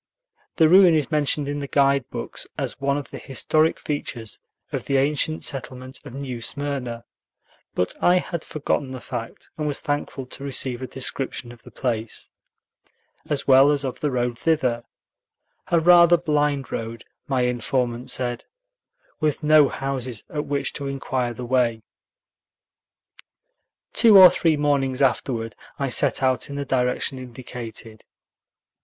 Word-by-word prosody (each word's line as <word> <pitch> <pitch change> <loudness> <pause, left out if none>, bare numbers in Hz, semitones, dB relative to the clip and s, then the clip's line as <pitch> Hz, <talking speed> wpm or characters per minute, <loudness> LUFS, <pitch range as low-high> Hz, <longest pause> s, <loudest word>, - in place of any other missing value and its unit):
The 160 - +5
ruin 180 0 +7
is 150 -1 0
mentioned 150 -1 +1
in 145 0 -3
the 140 - -4
guide 140 -2 +2
books - - -5
as - - -3
one 140 0 +1
of 145 - -7
the - - -7
historic 155 +4 +1
features 120 -7 -4 0.3
of - - -4
the 140 - +1
ancient 150 +3 0
settlement 130 -1 -5
of 120 - -10
New 130 -4 -5
Smyrna, 130 -3 -4 0.7
but 90 - 0
I 180 +1 +5
had 170 -2 -3
forgotten 145 -2 -2
the 130 - -6
fact, 120 -2 -7
and 150 - -1
was 145 - 0
thankful 145 -2 -3
to 130 +2 -6
receive 130 -2 -1
a 130 - -4
description 130 -2 -4
of 120 -1 -15
the - - -14
place, 115 -3 -4 1.0
as 145 -2 -1
well 135 +1 +7
as 145 -1 +1
of 130 - -4
the 150 - 0
road 120 -2 -1
thither, 125 -8 +1 0.8
a 170 - +3
rather 175 +1 +7
blind 150 -4 0
road, 115 0 -5 0.2
my 130 -2 +1
informant 125 +1 -1
said, 125 -1 -2 0.7
with 155 -1 -1
no 150 -2 +6
houses 130 -4 -4
at 150 -1 -3
which 140 -1 -1
to 140 -2 -5
inquire 130 -3 -2
the 125 - -6
way. 120 -3 +1 2.1
Two 220 -4 +7
or 185 -2 +10
three 165 -3 +2
mornings 140 -2 +1
afterward, 120 -3 0 0.2
I 140 -1 -1
set 125 - +2
out 130 -1 +1
in 140 - -6
the 140 0 -3
direction 130 +1 0
indicated. 120 -3 -8
135 Hz, 150 wpm, -23 LUFS, 125-145 Hz, 2.1 s, or